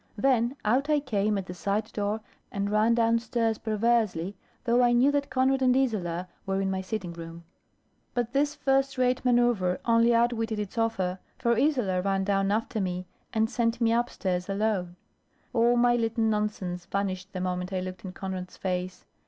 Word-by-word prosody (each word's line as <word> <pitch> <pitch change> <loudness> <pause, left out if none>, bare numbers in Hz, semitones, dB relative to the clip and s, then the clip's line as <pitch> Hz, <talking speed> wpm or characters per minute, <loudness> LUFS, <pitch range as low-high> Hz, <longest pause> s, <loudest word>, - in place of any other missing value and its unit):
Then 245 +1 +2
out 260 +7 +2
I 300 -1 +4
came 215 -6 0
at 195 - -3
the 180 - -7
side 205 +4 -2
door, 210 +1 -1 0.3
and 200 0 -2
ran 215 +2 +3
downstairs 230 -1 +1
perversely, 215 -4 0 0.3
though 240 0 +3
I 240 -1 +4
knew 255 +4 +4
that 285 -1 -1
Conrad 265 +1 +2
and 255 -1 +4
Isola 185 -9 -1 0.2
were 195 0 -1
in 195 0 0
my 190 0 -1
sitting 190 -3 -4
room. 165 0 -9 0.7
But 240 -1 -1
this 290 +1 +1
first 270 0 +1
rate 255 0 +1
manoeuvre 240 -7 +2
only 230 0 +4
outwitted 230 -2 +1
its 210 -2 -4
author, 190 -5 0 0.2
for 235 0 +2
Isola 240 -9 +1
ran 195 0 0
down 195 0 +1
after 225 +1 -1
me, 180 -1 -2 0.3
and 220 -1 +2
sent 230 0 0
me 230 -1 +3
upstairs 190 -6 -1
alone. 195 -3 -1 0.6
All 240 0 +4
my 240 0 +4
little 230 -1 0
nonsense 210 -5 -1
vanished 190 -1 -3
the 185 - -5
moment 180 0 -2
I 190 - -1
looked 185 0 -6
in 190 - -6
Conrad's 185 -1 -6
face. 180 -1 -3
220 Hz, 175 wpm, -27 LUFS, 190-240 Hz, 0.7 s, I